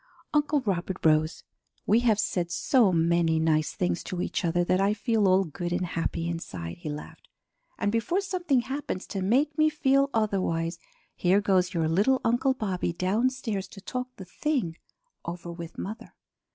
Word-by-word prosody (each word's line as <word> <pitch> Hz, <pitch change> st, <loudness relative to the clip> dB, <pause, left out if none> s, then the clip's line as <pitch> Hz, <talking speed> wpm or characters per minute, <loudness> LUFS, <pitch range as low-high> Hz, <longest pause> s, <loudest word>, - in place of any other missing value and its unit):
Uncle 295 Hz, -1 st, +2 dB
Robert 190 Hz, -5 st, -2 dB
rose. 155 Hz, +1 st, +3 dB, 0.4 s
"We 215 Hz, +3 st, +4 dB
have 225 Hz, -4 st, +2 dB
said 175 Hz, -4 st, -1 dB
so 215 Hz, +4 st, +3 dB
many 165 Hz, -1 st, +2 dB
nice 155 Hz, -1 st, +1 dB
things 180 Hz, -1 st, -1 dB
to 180 Hz, -3 st, -4 dB
each 180 Hz, -, -2 dB
other 175 Hz, +1 st, +2 dB
that 185 Hz, +2 st, +2 dB
I 200 Hz, +2 st, +2 dB
feel 215 Hz, 0 st, +1 dB
all 190 Hz, +1 st, +4 dB
good 175 Hz, +1 st, -5 dB
and 180 Hz, +1 st, 0 dB
happy 170 Hz, -1 st, -2 dB
inside," 95 Hz, -, -5 dB
he 165 Hz, -3 st, -5 dB
laughed. 150 Hz, 0 st, -8 dB, 0.5 s
"And 205 Hz, -, 0 dB
before 230 Hz, -, +1 dB
something 360 Hz, -9 st, 0 dB
happens 265 Hz, -7 st, -4 dB
to 195 Hz, -, -4 dB
make 270 Hz, +10 st, +2 dB
me 310 Hz, 0 st, +5 dB
feel 275 Hz, -2 st, +2 dB
otherwise, 185 Hz, -7 st, 0 dB, 0.4 s
here 185 Hz, +3 st, +3 dB
goes 185 Hz, -2 st, +1 dB
your 165 Hz, -2 st, +1 dB
little 205 Hz, +11 st, +3 dB
Uncle 250 Hz, +3 st, +2 dB
Bobby 190 Hz, -7 st, -2 dB
downstairs 210 Hz, +3 st, -1 dB
to -, -, -12 dB
talk 250 Hz, +4 st, -4 dB
the 190 Hz, -, -9 dB
thing 230 Hz, -, -1 dB, 0.5 s
over 170 Hz, 0 st, -6 dB
with 170 Hz, -1 st, -8 dB
mother. 215 Hz, +4 st, -7 dB
190 Hz, 165 wpm, -27 LUFS, 170-240 Hz, 0.5 s, me